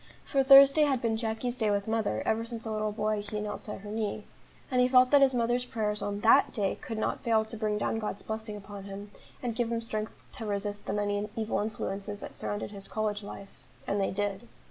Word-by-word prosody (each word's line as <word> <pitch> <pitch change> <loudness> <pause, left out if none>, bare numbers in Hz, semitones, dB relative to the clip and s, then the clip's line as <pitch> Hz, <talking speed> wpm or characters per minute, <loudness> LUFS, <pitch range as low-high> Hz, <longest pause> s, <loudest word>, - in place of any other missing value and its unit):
For 275 -2 +2
Thursday 275 +2 +8
had 270 -3 +1
been 230 -2 0
Jacky's 225 +2 -2
day 220 -4 0
with 200 0 0
mother, 220 - 0
ever 220 +1 +1
since 230 0 -7
a 220 - -3
little 215 0 -1
boy 215 0 -1
he 210 +1 -4
knelt 210 0 -5
at 210 - -6
her 205 0 -8
knee; 215 -1 -2 0.5
and 250 -1 +3
he 250 - +5
felt 255 0 +5
that 285 -1 +7
his 265 -2 +5
mother's 240 +1 +1
prayers 210 -3 -2
on 205 0 -3
that 225 - +6
day 200 -3 0
could 225 - -5
not 220 - -1
fail 220 -2 +3
to 220 - -8
bring 215 -1 -1
down 225 +2 -1
God's 210 -2 -4
blessing 220 -1 -4
upon 200 -1 -9
him, 200 +1 -8 0.3
and 235 -2 -2
give 235 0 0
him 230 - 0
strength 215 -1 -5
to 225 - -5
resist 205 0 -3
the - - -1
many 205 0 -1
evil 225 -1 -1
influences 205 -1 -4
that - - -7
surrounded 205 0 -4
his 200 -1 -8
college 215 -1 -2
life 200 -1 -10 0.2
and 200 0 0
they 195 - +1
did. 205 +3 -2
215 Hz, 230 wpm, -29 LUFS, 205-230 Hz, 0.5 s, Thursday